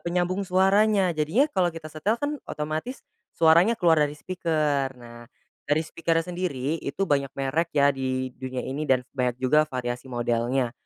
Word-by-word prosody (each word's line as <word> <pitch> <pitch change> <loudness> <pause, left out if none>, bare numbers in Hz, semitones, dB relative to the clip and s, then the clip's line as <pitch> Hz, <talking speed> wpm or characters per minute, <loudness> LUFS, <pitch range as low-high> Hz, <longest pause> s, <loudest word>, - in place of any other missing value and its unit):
penyambung 180 +2 -1
suaranya, 195 +1 +3
jadinya 160 - +2
kalau 180 -6 +2
kita 155 -1 -8
setel 200 +8 0
kan 290 +4 -3
otomatis 155 - -4 0.3
suaranya 170 +7 +5
keluar 165 -5 +4
dari 145 0 0
speaker. 155 -6 -1
Nah, 120 -1 -13 0.4
dari 150 +2 +2
speaker-nya 165 0 -1
sendiri, 165 -4 -3
itu 140 +8 -2
banyak 140 -4 +1
merek 140 +5 0
ya, 140 0 +5
di 130 -1 -3
dunia 130 0 -5
ini 145 +3 -4
dan 130 -1 +3
banyak 125 -3 -1
juga 150 +4 +2
variasi 125 0 -4
modelnya. 120 +1 0
150 Hz, 155 wpm, -25 LUFS, 130-175 Hz, 0.4 s, suaranya